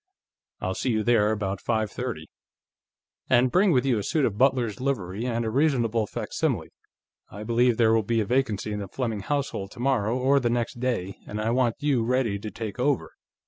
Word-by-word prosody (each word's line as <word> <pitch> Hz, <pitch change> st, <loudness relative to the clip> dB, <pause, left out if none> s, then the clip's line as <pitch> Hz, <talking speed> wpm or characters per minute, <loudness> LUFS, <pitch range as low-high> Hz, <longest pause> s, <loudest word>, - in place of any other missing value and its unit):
I'll -, -, -1 dB
see 130 Hz, -, -2 dB
you 110 Hz, -2 st, +1 dB
there 110 Hz, -2 st, +3 dB
about 100 Hz, -2 st, -2 dB
five 110 Hz, -3 st, -1 dB
thirty. 115 Hz, -12 st, -5 dB, 1.0 s
And 125 Hz, 0 st, +4 dB
bring 190 Hz, +1 st, +4 dB
with 130 Hz, -3 st, +2 dB
you 125 Hz, -5 st, +2 dB
a -, -, -3 dB
suit 155 Hz, -, +1 dB
of 100 Hz, -, -1 dB
butler's 125 Hz, -2 st, +1 dB
livery, 110 Hz, -4 st, -2 dB
or 115 Hz, -2 st, -1 dB
reasonable 120 Hz, -5 st, +1 dB
facsimile. -, -, -2 dB, 0.6 s
I 105 Hz, +2 st, -8 dB
believe 120 Hz, +1 st, +2 dB
there 115 Hz, -1 st, +4 dB
will 115 Hz, -, +4 dB
be 115 Hz, +2 st, 0 dB
a 110 Hz, -, +1 dB
vacancy 115 Hz, -4 st, 0 dB
in 105 Hz, -, -3 dB
the 100 Hz, -, -5 dB
Fleming 115 Hz, 0 st, -3 dB
household 140 Hz, -4 st, -2 dB
tomorrow 120 Hz, -2 st, 0 dB
or 135 Hz, +2 st, +3 dB
the 120 Hz, -3 st, 0 dB
next 120 Hz, 0 st, -2 dB
day, 115 Hz, -7 st, -2 dB
and 105 Hz, -, -5 dB
I 110 Hz, +2 st, 0 dB
want 120 Hz, -2 st, +2 dB
you 135 Hz, -6 st, +2 dB
ready 120 Hz, -4 st, 0 dB
to 110 Hz, -, -6 dB
take 110 Hz, +2 st, -6 dB
over. 135 Hz, +1 st, 0 dB
115 Hz, 190 wpm, -26 LUFS, 105-130 Hz, 1.0 s, And